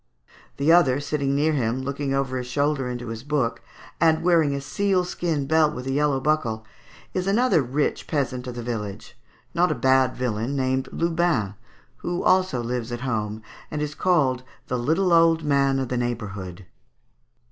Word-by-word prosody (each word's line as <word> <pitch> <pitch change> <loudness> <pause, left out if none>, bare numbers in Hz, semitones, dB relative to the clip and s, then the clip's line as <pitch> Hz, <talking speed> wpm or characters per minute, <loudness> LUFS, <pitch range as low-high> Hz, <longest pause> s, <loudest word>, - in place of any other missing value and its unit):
The 145 +3 +3
other 145 -6 +5
sitting 140 -1 -1
near 155 +2 +2
him, 130 -1 -1
looking 140 +1 -3
over 135 -1 -1
his 125 - -5
shoulder 140 0 0
into 120 -1 -5
his 115 -1 -5
book, 130 -4 -1 0.4
and 160 0 +3
wearing 165 -5 +3
a - - -2
sealskin 175 -2 -1
belt 155 +1 +3
with 125 - -6
a 135 - -2
yellow 145 -1 +1
buckle, 130 -7 0 0.5
is 185 0 -2
another 220 -3 +3
rich 135 +3 -1
peasant 130 -4 -2
of 125 - -6
the 120 - -5
village, 110 -2 -5 0.4
not 175 +1 +2
a - - 0
bad 130 -1 +3
villain, 120 +1 -2
named 130 0 0
Lubin, 165 - 0 0.4
who 175 0 -3
also 185 -10 +2
lives 120 0 -3
at 120 0 -4
home, 110 -4 -3 0.3
and 150 - -4
is 150 0 -2
called 150 -9 +2 0.2
the 125 - -2
little 165 +8 +2
old 165 -1 +4
man 140 -2 +2
of 130 -2 -2
the 125 - -1
neighbourhood." 100 -7 -4
135 Hz, 170 wpm, -24 LUFS, 125-155 Hz, 0.5 s, other